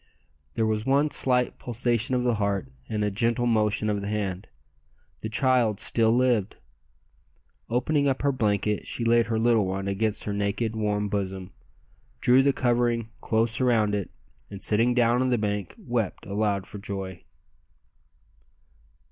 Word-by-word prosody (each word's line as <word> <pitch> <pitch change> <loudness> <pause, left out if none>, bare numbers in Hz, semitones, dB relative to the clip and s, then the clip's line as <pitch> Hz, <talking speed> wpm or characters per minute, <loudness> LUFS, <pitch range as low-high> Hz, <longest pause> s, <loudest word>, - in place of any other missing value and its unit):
There 110 - +1
was 110 -1 0
one 140 +4 +2
slight 125 -1 +1
pulsation 120 +1 0
of 125 - 0
the 120 -1 +2
heart 100 -10 -1 0.2
and 105 -1 -1
a 105 - 0
gentle 115 +4 0
motion 110 -2 +1
of 105 -1 -1
the 100 - -5
hand! 100 -3 -3 0.7
The 110 - -5
child 120 -3 +2
still 115 -1 +2
lived. 120 -4 +1 1.1
Opening 140 +5 +1
up 135 0 -1
her 140 - +3
blanket 105 -4 0
she 120 - -2
laid 115 0 +3
her 115 -1 -1
little 115 -3 +3
one 95 +1 -3
against 105 +2 -1
her 105 - -3
naked, 105 +3 -1
warm 105 -1 -1
bosom, 95 -2 -4 0.7
drew 125 +2 +5
the 140 +1 +3
covering 120 -3 0
close 115 +2 +1
around 115 -5 +2
it, 100 -2 -2 0.4
and 100 -1 -8
sitting 115 +3 +2
down 120 0 +3
on 130 - +1
the 125 - +2
bank 105 -4 -3
wept 115 -5 -3
aloud 100 -1 -1
for 100 - -9
joy. 95 -3 -6
110 Hz, 155 wpm, -26 LUFS, 100-120 Hz, 1.1 s, drew